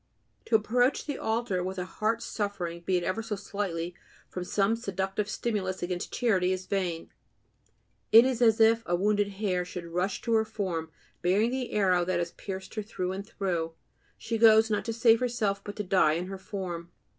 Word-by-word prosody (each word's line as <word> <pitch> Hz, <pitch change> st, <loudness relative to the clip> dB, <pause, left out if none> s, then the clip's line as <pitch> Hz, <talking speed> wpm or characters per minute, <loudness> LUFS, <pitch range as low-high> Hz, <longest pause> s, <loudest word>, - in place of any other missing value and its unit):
To 230 Hz, -, +2 dB
approach 245 Hz, +5 st, +2 dB
the 290 Hz, -3 st, -4 dB
altar 220 Hz, -5 st, -1 dB
with 190 Hz, +1 st, -4 dB
a 180 Hz, -, -2 dB
heart 220 Hz, +4 st, -1 dB
suffering, 180 Hz, -5 st, -3 dB
be 185 Hz, +1 st, +1 dB
it 175 Hz, -, -2 dB
ever 215 Hz, +6 st, -1 dB
so 220 Hz, -1 st, -3 dB
slightly, 185 Hz, -4 st, -3 dB, 0.3 s
from 180 Hz, -, -5 dB
some 200 Hz, +4 st, +1 dB
seductive 195 Hz, -2 st, -2 dB
stimulus 200 Hz, -5 st, -2 dB
against 175 Hz, 0 st, -3 dB
charity 190 Hz, -7 st, +2 dB
is 185 Hz, 0 st, -2 dB
vain; 185 Hz, -4 st, -2 dB, 1.0 s
it 230 Hz, +3 st, +9 dB
is 255 Hz, -2 st, 0 dB
as 225 Hz, -2 st, +5 dB
if 225 Hz, +1 st, +5 dB
a 175 Hz, -, +2 dB
wounded 205 Hz, +2 st, +2 dB
hare 190 Hz, -3 st, -1 dB
should 180 Hz, -1 st, -7 dB
rush 180 Hz, +3 st, -1 dB
to 230 Hz, -, 0 dB
her 220 Hz, -1 st, +4 dB
form, 185 Hz, -7 st, -3 dB, 0.3 s
bearing 200 Hz, +7 st, +2 dB
the 255 Hz, -2 st, -3 dB
arrow 185 Hz, -4 st, +3 dB
that 180 Hz, 0 st, 0 dB
has 170 Hz, 0 st, -2 dB
pierced 190 Hz, -1 st, -7 dB
her 215 Hz, -, -2 dB
through 185 Hz, -4 st, -3 dB
and 195 Hz, +2 st, -5 dB
through; 175 Hz, -7 st, -2 dB, 0.4 s
she 225 Hz, -1 st, -3 dB
goes, 220 Hz, 0 st, +6 dB
not 205 Hz, -1 st, 0 dB
to 230 Hz, -, -1 dB
save 230 Hz, 0 st, +5 dB
herself, 220 Hz, -6 st, -1 dB
but 205 Hz, -, -7 dB
to 210 Hz, -, -3 dB
die 185 Hz, -5 st, +3 dB
in 170 Hz, +3 st, -2 dB
her 190 Hz, +1 st, -7 dB
form. 185 Hz, -4 st, -5 dB
200 Hz, 190 wpm, -28 LUFS, 180-220 Hz, 1.0 s, it